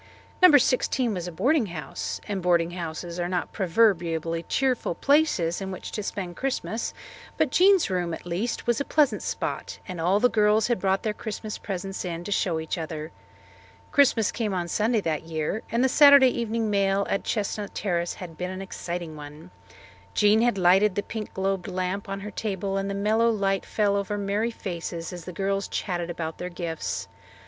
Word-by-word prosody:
No. 360 -5 +9
16 255 -2 +1
was 180 -2 -4
a - - -5
boarding 260 - +2
house, 155 -6 -5
and 200 -2 -2
boarding 170 -1 +2
houses 170 0 -5
are 175 0 -1
not 180 -1 -2
proverbially 165 -4 +1
cheerful 255 -9 0
places 275 - +2
in 190 - -4
which 185 - -7
to 210 - -3
spend 185 -3 -5
Christmas, 255 -4 -2 0.5
but - - +2
Jean's 380 0 +5
room, 180 -2 -1
at 165 - -6
least, 180 +7 -2
was 240 +2 +1
a - - +1
pleasant 295 -1 +2
spot, - - -4
and 180 -4 -5
all 185 +5 +3
the 250 - +5
girls 215 -1 +3
had 240 - +1
brought 190 0 +1
their 215 - 0
Christmas 215 0 -6
presents 195 -1 -4
in 170 -2 -4
to 205 - -6
show 175 -5 +1
each 160 +2 -3
other. 155 -1 -5 0.8
Christmas 245 -7 +4
came 215 -5 -2
on 175 -1 -2
Sunday 220 +4 +1
that 160 -3 -2
year 160 +6 -2
and 235 +2 +2
the - - +5
Saturday 280 -1 +8
evening 230 -2 -1
mail 200 0 +2
at 195 - -1
Chestnut 210 -1 -2
Terrace 175 -3 -1
had 175 -3 -9
been 180 0 -2
an 185 0 -6
exciting 175 -4 -5
one. 150 +4 -11 0.6
Jean 210 +1 +5
had 240 -3 +2
lighted 190 +2 +4
the 205 - -1
pink 220 -2 -6
globed 190 -1 -1
lamp 185 +1 -3
on 195 0 -4
her 210 +1 -6
table 195 -2 -3
and 195 0 -1
the 200 - -2
mellow 215 +3 +2
light 195 -3 0
fell 205 -2 +1
over 200 +1 -1
merry 205 +3 0
faces 170 -5 -5
as 175 -1 -8
the 180 - -6
girls 195 +2 -1
chatted 175 -2 -3
about 165 -2 -5
their 180 - -4
gifts. 165 - -4
195 Hz, 190 wpm, -26 LUFS, 175-220 Hz, 0.8 s, No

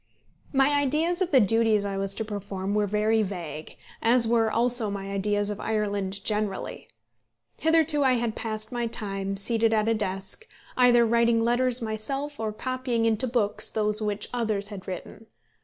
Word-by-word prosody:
My 270 +1 +3
ideas 305 +6 +1
of 365 - +1
the 275 - +5
duties 220 -1 +2
I 200 -1 -3
was 195 0 0
to 220 - -3
perform 200 -2 -4
were 210 0 +1
very 215 +2 +2
vague, 175 -6 -6 0.2
as 235 0 +4
were 225 -1 +2
also 235 -1 +1
my 195 -1 -5
ideas 205 +1 +1
of 205 - -6
Ireland 200 -2 -2
generally. 210 -2 -3 0.7
Hitherto 320 -2 +3
I 260 -1 +4
had 235 -2 -1
passed 215 0 -4
my 240 -1 -2
time, 195 -3 -3
seated 225 +2 +1
at 215 0 +1
a 230 - +3
desk, 200 - -4 0.3
either 245 -2 +5
writing 235 0 +3
letters 245 +1 +1
myself, 270 +7 -4
or 220 -1 -2
copying 255 0 -2
into 225 +3 +1
books 225 -4 +1
those 210 0 -1
which 210 -1 -2
others 215 -4 -1
had 195 -3 -9
written. 190 +4 -8
220 Hz, 165 wpm, -26 LUFS, 205-240 Hz, 0.7 s, the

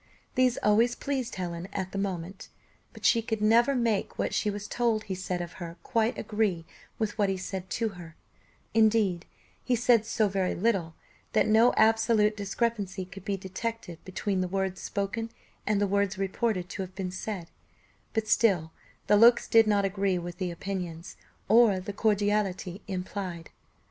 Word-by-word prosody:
These 255 -2 +3
always 225 +4 +4
pleased 265 -4 -3
Helen 175 -1 -4
at 190 -2 -4
the 195 - -3
moment, 190 -1 -4 0.4
but - - -10
she 230 - +5
could 220 -1 -3
never 235 +6 +4
make 230 -5 0
what - - -1
she 210 - +1
was 205 0 -5
told 230 -3 0
he 195 - -4
said 180 -1 -3
of 175 - -9
her 170 0 -6
quite 230 -1 0
agree 210 -6 -1 0.3
with 220 -1 -3
what 200 -1 +3
he 190 - -1
said 185 0 -5
to 225 -1 -1
her: 175 -4 -11 0.6
indeed, 215 -5 +3 0.4
he 250 - +1
said 235 -2 +3
so 220 -1 +2
very 190 -2 -1
little, 180 -6 0 0.4
that - - +4
no 225 +3 +5
absolute 220 -1 +3
discrepancy 200 -2 -2
could 190 +1 -11
be 200 -1 -2
detected 190 -2 -5
between 190 0 -2
the 185 - -1
words 190 -1 -2
spoken 210 +3 -3 0.4
and 210 -1 +2
the 205 - +2
words 200 0 0
reported 195 -1 -1
to 195 - -5
have 185 0 -7
been 185 -2 -3
said; 185 -2 -5 0.6
but 220 -1 -1
still 180 -9 +3 0.3
the 210 - +5
looks 235 +3 +6
did 225 -1 +5
not 205 -2 +3
agree 195 -1 0
with 175 +1 -6
the 185 -2 -1
opinions, 175 -2 -5 0.3
or 220 -3 +5
the 195 +2 -6
cordiality 205 -3 0
implied. 185 -3 -5
200 Hz, 170 wpm, -28 LUFS, 185-220 Hz, 0.6 s, looks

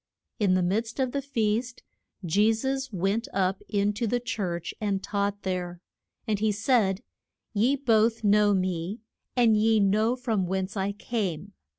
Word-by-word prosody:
In 195 -4 +3
the 185 - +2
midst 225 +7 -1
of 260 -2 +1
the 280 - -2
feast 235 -2 -1 0.4
Je 205 +7 +3
sus 265 +3 -2
went 200 +4 -1
up 190 0 +1
in 205 0 +1
to 230 +3 -2
the 245 +3 +1
church 185 -8 -3
and 200 -2 -1
taught 200 0 -2
there. 180 -2 -3 0.5
And 210 -2 0
he 215 0 +2
said, 210 -3 +1 0.5
Ye 235 +6 +3
both 230 -4 +2
know 205 0 +4
me, 185 +3 -2 0.3
and 235 -3 +4
ye 220 +1 +3
know 215 +4 +2
from 225 -7 -1
whence 190 +2 -2
I 195 0 -1
came. 200 -4 -3
210 Hz, 160 wpm, -27 LUFS, 195-230 Hz, 0.5 s, know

